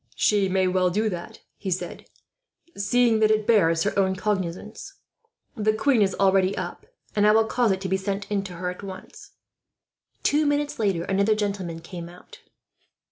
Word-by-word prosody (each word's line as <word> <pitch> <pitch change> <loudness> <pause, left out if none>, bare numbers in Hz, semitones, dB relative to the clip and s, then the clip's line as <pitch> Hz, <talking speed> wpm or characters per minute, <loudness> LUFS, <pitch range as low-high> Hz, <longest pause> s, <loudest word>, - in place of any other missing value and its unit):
"She 200 -2 +2
may 190 0 +2
well 185 0 +2
do 215 +4 0
that," 175 -3 -7 0.2
he 195 - -5
said, 185 0 -4 0.7
"seeing 230 +2 +2
that 215 0 +4
it 215 -1 +2
bears 165 -8 +3
her - - 0
own 190 -1 +2
cognizance. 210 - -4 0.6
The 215 -2 +1
queen 240 +1 +2
is 195 -2 +2
already 195 0 +2
up, - - -6 0.3
and 210 0 +4
I - - +7
will 220 0 +4
cause 235 -1 +1
it 190 0 -1
to 195 - -3
be 190 +1 +1
sent 195 +1 -3
in 200 -1 0
to 185 - -7
her, 180 +1 -3
at 180 - -10
once." 190 -2 -10 0.9
Two 300 +1 +2
minutes 290 -2 -1
later 195 -6 0
another 200 +3 +2
gentleman 195 -6 -3
came 170 0 -8
out. 180 +1 -15
200 Hz, 180 wpm, -25 LUFS, 185-215 Hz, 0.9 s, I